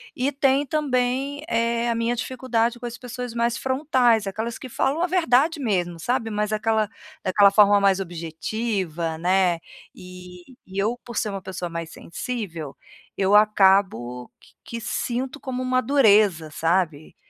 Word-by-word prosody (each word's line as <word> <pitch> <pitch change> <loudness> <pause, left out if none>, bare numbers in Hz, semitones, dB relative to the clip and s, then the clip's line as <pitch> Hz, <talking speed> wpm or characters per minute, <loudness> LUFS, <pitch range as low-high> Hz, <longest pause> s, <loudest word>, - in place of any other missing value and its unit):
E 265 +3 0
tem 275 0 +2
também, 275 0 -1
eh, 230 +1 0
a 235 - 0
minha 230 +1 0
dificuldade 240 -1 -1
com 245 - -7
as 240 0 -6
pessoas 245 -1 -6
mais 235 0 0
frontais, 260 -5 +2
aquelas 220 +4 -4
que 260 - -8
falam 275 +6 0
a 355 - +2
verdade 325 -3 +2
mesmo, 180 -9 -1
sabe, 235 +4 -1
mas 210 0 -1
aquela 215 -1 +1 0.3
daquela 200 +2 +5
forma 205 0 +5
mais 195 -1 +3
objetiva, 170 0 -3
né, 180 0 +2 0.4
e 180 -1 -12 0.2
e 190 +1 -9
eu 230 +4 0
por 235 -3 -7
ser 215 - 0
uma 195 -1 -5
pessoa 185 -2 -5
mais 165 -1 -5
sensível, 170 - -6 0.4
eu 195 +1 +3
acabo 190 - +3
que - - -22
que 230 0 -6
sinto 255 +4 -3
como 255 -2 -4
uma 255 0 +1
dureza, 210 - +3
sabe, 165 -1 -1
220 Hz, 155 wpm, -23 LUFS, 185-250 Hz, 0.4 s, daquela